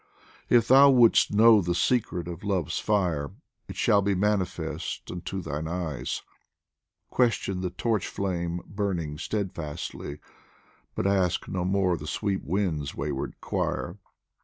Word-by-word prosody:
If 115 -2 +4
thou 135 +2 +8
would' 120 -4 +6
st 105 - +3
know 110 -1 +7
the 85 -1 -1
secret 90 -5 0
of 85 -1 -7
Love's 95 -6 -1
fire, 90 -9 0 0.3
It - - -8
shall 100 - +3
be 100 0 +1
manifest 90 -5 -2
unto 95 +2 -5
thine 75 +2 -4
eyes: 80 -7 -3 0.9
Question 105 -6 +1
the 90 - -1
torch 105 +3 -1
flame 85 -3 -2
burning 90 -7 -3
steadfastly, 85 -7 -4 0.8
But - - -2
ask 95 -3 +1
no 90 -1 -2
more 95 -2 +1
the 75 +1 -8
sweet 100 +2 -2
wind's 80 -6 -1
wayward 65 - -4
choir. 85 +3 -2
90 Hz, 135 wpm, -27 LUFS, 85-100 Hz, 0.9 s, thou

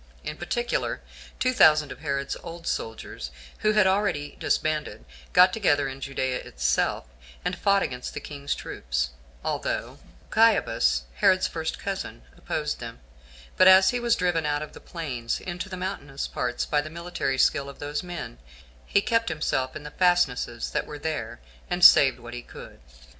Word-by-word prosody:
In 150 - -4
particular, 240 +9 -2 0.4
two 255 0 +1
thousand 155 - +5
of - - -9
Herod's 140 -2 -2
old 170 0 -9
soldiers, 110 - -4 0.3
who 215 0 +2
had 210 -1 +5
been - - +3
already 175 -8 -1
disbanded, 155 - -1 0.3
got 180 +1 +6
together 145 -10 +2
in 135 0 -7
Judea 130 -2 -1
itself, 60 0 0 0.4
and 180 - 0
fought 200 +2 +3
against 125 -1 -5
the - - -2
king's 145 -1 -4
troops, - - -3 0.3
although - - -3 0.3
Achiabus, - - +3
Herod's 185 0 +4
first 160 -1 -3
cousin, 195 - -5
opposed - - -3
them; - - -8 0.6
but 185 - +7
as 190 0 +8
he 245 - -1
was 235 -1 +2
driven 175 -3 +1
out 145 0 0
of 155 - -10
the - - -11
plains 130 -9 -4
into 180 +1 -5
the 185 - -6
mountainous 180 -7 -4
parts 125 0 -2
by 150 - +1
the 155 - -8
military 170 -5 -3
skill 140 +1 +2
of 140 - -11
those 145 0 -3
men, 175 - -7 0.5
he 200 - +3
kept 230 -3 +1
himself 135 -4 -1
in - - -7
the 150 - -8
fastnesses 145 -11 +1
that - - -1
were 150 - -7
there, 145 - -4 0.3
and 180 0 +4
saved 135 -3 +8
what 120 -1 -10
he 120 - -5
could. - - -12
150 Hz, 170 wpm, -26 LUFS, 130-180 Hz, 0.6 s, as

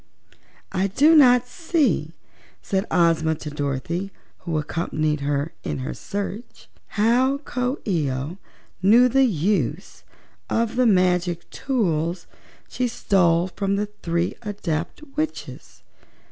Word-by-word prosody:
"I 190 +1 +1
do 295 - +4
not 250 -4 +6
see," 270 - 0 0.5
said 195 +2 -1
Ozma 160 -2 +2
to 150 0 -7
Dorothy, 150 +6 -3 0.3
who 165 -3 -3
accompanied 155 0 -1
her 145 +2 -1
in - - -3
her 130 - -4
search, 205 +3 -6 0.3
"how 245 +6 +3
Coo 255 -1 -2
ee 165 -8 +1
oh 135 +8 -4 0.4
knew 230 +6 +6
the 270 +2 +4
use 180 - -1 0.5
of 230 0 0
the 250 -1 +3
magic 180 -3 +2
tools 175 - -1 0.4
she 250 - -1
stole 180 -7 +2
from 195 +1 -1
the 205 +1 -2
three 170 +1 0
Adept 190 - -4
Witches. 310 +1 -5
185 Hz, 120 wpm, -23 LUFS, 160-235 Hz, 0.5 s, not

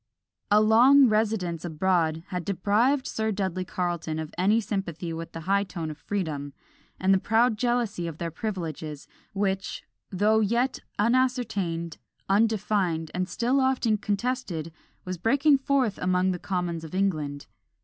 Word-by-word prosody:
A 210 - +6
long 250 +6 +6
residence 210 -6 0
abroad 165 -1 0
had 180 -2 -3
deprived 215 - +1
Sir 220 0 -1
Dudley 190 -2 -2
Carleton 175 -4 -3
of 160 -1 -5
any 200 +6 +3
sympathy 180 -6 -3
with 165 0 -6
the 165 - -7
high 200 +4 +2
tone 170 -5 -5
of 150 - -9
freedom, 150 -8 -3 0.5
and 190 +1 +3
the 190 - +4
proud 225 +3 +2
jealousy 230 -6 -1
of 160 -2 -6
their 170 0 -4
privileges, 160 -6 -5 0.3
which, 195 -1 -2 0.3
though 210 +3 +2
yet 235 +5 +1 0.2
unascertained, 210 -8 0 0.3
undefined, 195 -6 +1
and 185 +1 -2
still 240 +8 +1
often 260 -4 +2
contested, 205 - -2 0.3
was 185 -2 -4
breaking 280 - +3
forth 265 -6 +1
among 185 +1 +2
the 180 - -3
commons 175 -3 -3
of 160 +2 -8
England. 155 -7 -1
195 Hz, 140 wpm, -26 LUFS, 170-220 Hz, 0.5 s, A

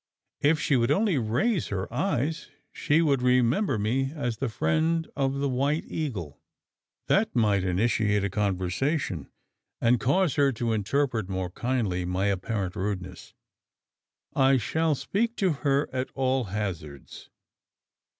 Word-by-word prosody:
"If 150 +2 +3
she 145 - +1
would 115 -1 +1
only 200 -8 +2
raise 150 - 0
her 95 -2 -3
eyes, 155 0 -1 0.2
she 160 +3 +2
would 140 -5 +2
remember 125 - +2
me 130 +6 0
as 120 -7 -2
the 135 - -2
friend 160 - 0
of 135 -1 0
the 140 +1 0
White 140 +4 0
Eagle. 105 - -5 0.7
That - - +1
might 105 -5 +2
initiate 105 +2 +1
a 100 - 0
conversation; 100 - -1 0.5
and 120 0 +3
cause 155 +4 +1
her 140 -1 +4
to 115 0 -1
interpret 110 -1 0
more 95 -2 -3
kindly 110 -5 -1
my 90 +2 -1
apparent 100 -1 -1
rudeness. 95 -2 -5 1.0
I 135 0 +4
shall 160 +6 0
speak 230 - -1
to 190 -3 +1
her 140 0 +2
at 130 0 -2
all 130 -1 +1
hazards. 90 -9 -6
125 Hz, 135 wpm, -27 LUFS, 100-145 Hz, 1.0 s, her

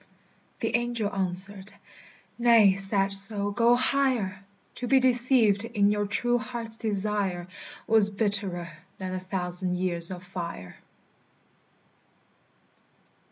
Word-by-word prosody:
The - - -1
angel 240 -3 -2
answered, 190 +1 -1 0.7
"Nay, 230 -5 +5
sad 195 0 0
soul, 200 +1 +5
go 235 +3 +3
higher! 245 -7 -1 0.3
To 245 - -5
be 270 +2 +4
deceived 240 -5 +4
in 210 -3 0
your 205 0 -2
true 240 +4 0
heart's 235 -2 -6
desire 200 -4 -2 0.4
Was 220 -2 +3
bitterer 200 -5 -1 0.3
than 185 -1 -6
a 185 - -4
thousand 180 -1 -2
years 175 -2 0
of 185 -1 -8
fire!" 170 - -8
200 Hz, 110 wpm, -26 LUFS, 185-230 Hz, 0.7 s, Nay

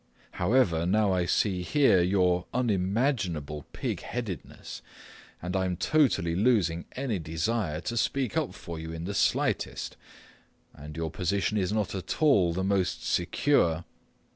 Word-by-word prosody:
However, 90 -5 +2
now 100 0 +3
I 90 -1 0
see 95 -2 +1
here 130 -2 +4
your 90 -1 +2
unimaginable 95 - 0
pig - - -3
headedness, 115 -8 -6 0.6
and 90 +1 -3
I 95 -1 +1
am 90 -1 -2
totally 130 - +2
losing 95 -6 +2
any 125 -7 -2
desire 80 +1 -2
to 120 - -4
speak 130 0 0
up - - -1
for 85 -1 -7
you 80 0 -6
in 80 0 -6
the 100 - -3
slightest. - - 0 0.8
And 75 +2 -10
your 80 -1 -2
position 100 +4 0
is 95 0 0
not 105 -2 -1
at 95 -4 -4
all 120 - +4
the 95 +3 -2
most 95 -1 0
secure. 85 - +2
95 Hz, 140 wpm, -28 LUFS, 85-110 Hz, 0.8 s, here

